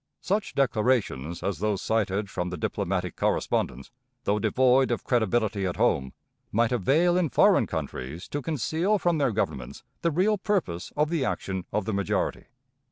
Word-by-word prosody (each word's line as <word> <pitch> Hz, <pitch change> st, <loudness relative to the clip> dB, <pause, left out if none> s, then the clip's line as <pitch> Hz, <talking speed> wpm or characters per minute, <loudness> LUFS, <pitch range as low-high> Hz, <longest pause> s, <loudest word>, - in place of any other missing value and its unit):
Such 205 Hz, +2 st, -1 dB
declarations 110 Hz, -, 0 dB
as 100 Hz, -6 st, -2 dB
those 105 Hz, -1 st, 0 dB
cited 105 Hz, -2 st, 0 dB
from 90 Hz, -1 st, -3 dB
the 90 Hz, -, -5 dB
diplomatic 90 Hz, +2 st, -2 dB
correspondence, 65 Hz, +3 st, -1 dB, 0.3 s
though 105 Hz, -2 st, +1 dB
devoid 130 Hz, +4 st, +3 dB
of 120 Hz, -, -1 dB
credibility 110 Hz, -4 st, +1 dB
at 90 Hz, -, -3 dB
home, 65 Hz, -1 st, +1 dB, 0.4 s
might 115 Hz, +2 st, +2 dB
avail 145 Hz, -, +3 dB
in 175 Hz, -4 st, +1 dB
foreign -, -, +4 dB
countries 70 Hz, +8 st, -5 dB
to 145 Hz, -, -3 dB
conceal 160 Hz, -, 0 dB
from 175 Hz, -4 st, +1 dB
their 140 Hz, -2 st, +3 dB
governments 65 Hz, -, -3 dB, 0.2 s
the 170 Hz, -, +2 dB
real 190 Hz, +6 st, +2 dB
purpose 180 Hz, -, -1 dB
of 150 Hz, +2 st, +2 dB
the 165 Hz, -5 st, +1 dB
action 95 Hz, -7 st, -3 dB
of 105 Hz, -2 st, -1 dB
the 110 Hz, -, -2 dB
majority. 100 Hz, -3 st, -1 dB
110 Hz, 160 wpm, -27 LUFS, 95-150 Hz, 0.4 s, foreign